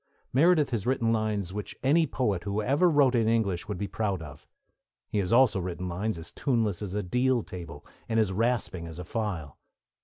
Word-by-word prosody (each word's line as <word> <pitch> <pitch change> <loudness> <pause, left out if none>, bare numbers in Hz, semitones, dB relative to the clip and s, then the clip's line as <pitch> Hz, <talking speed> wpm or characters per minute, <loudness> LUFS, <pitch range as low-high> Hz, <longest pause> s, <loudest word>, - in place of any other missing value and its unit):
Meredith 155 +1 +4
has 115 -2 -2
written 115 -3 +2
lines 105 -4 -1
which 105 -1 -6
any 155 +4 +4
poet 105 -10 -1
who 100 +3 -2
ever 140 +11 +3
wrote 145 -5 +4
in 115 -3 +2
English 105 -6 0
would 105 -3 -3
be 100 - -2
proud 100 -1 -2
of; 75 -4 -11 0.6
he 105 - -1
has 95 -2 -1
also 120 -4 +5
written 90 0 -4
lines 90 +3 -2
as 80 - -8
tuneless 115 - 0
as 100 -2 -4
a 105 - -1
deal 125 +5 +1
table 85 -5 -9 0.2
and 115 0 +2
as 105 -4 +2
rasping 105 -6 -1
as 80 -1 -9
a 90 - -6
file. 90 - -4
105 Hz, 195 wpm, -28 LUFS, 90-125 Hz, 0.6 s, also